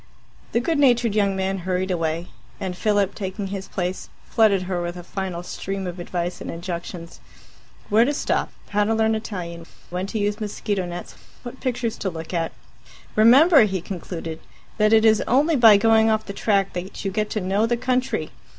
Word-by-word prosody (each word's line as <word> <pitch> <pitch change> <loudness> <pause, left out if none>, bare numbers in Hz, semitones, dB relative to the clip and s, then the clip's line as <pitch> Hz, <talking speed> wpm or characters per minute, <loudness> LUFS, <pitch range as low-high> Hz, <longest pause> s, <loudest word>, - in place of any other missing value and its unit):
The 235 - +2
good 300 +5 0
natured 240 -5 +4
young 200 -2 +2
man 190 0 -1
hurried 185 +1 -1
away, 165 -1 -2 0.3
and 185 -2 -4
Philip, 205 0 +1
taking 195 +1 -4
his 195 -1 -5
place, 180 0 -4 0.2
flooded 205 -4 +3
her 180 -1 -2
with 175 +1 -4
a 175 - -8
final 185 -1 -4
stream 195 +2 -5
of 180 0 -5
advice 175 0 -3
and - - -6
injunctions 170 -1 -6 0.7
where 215 +3 +5
to 270 - +1
stop, 295 - -1 0.2
how 205 0 +2
to 225 +1 +1
learn 220 0 +2
Italian, 175 -6 -5 0.2
when 180 +2 -2
to 220 - -4
use 205 +1 -1
mosquito 205 -2 -2
nets, 175 0 -7 0.3
what 245 +1 -8
pictures 240 -3 -2
to 190 - -1
look 165 0 -7
at. 165 -1 -1 0.6
"Remember," 260 +5 +7
he 190 -2 -2
concluded, 165 -2 -6 0.4
"that 215 0 +4
it 220 0 +5
is 220 -1 +5
only 295 +6 +3
by 225 -5 +8
going 225 +1 +4
off 220 0 +1
the 200 - -6
track 200 -1 +1
that 180 +3 -6
you 195 - 0
get 210 +2 -1
to 215 - -2
know 200 +4 +1
the 240 0 +1
country. 255 +1 -1
200 Hz, 185 wpm, -23 LUFS, 180-220 Hz, 0.7 s, by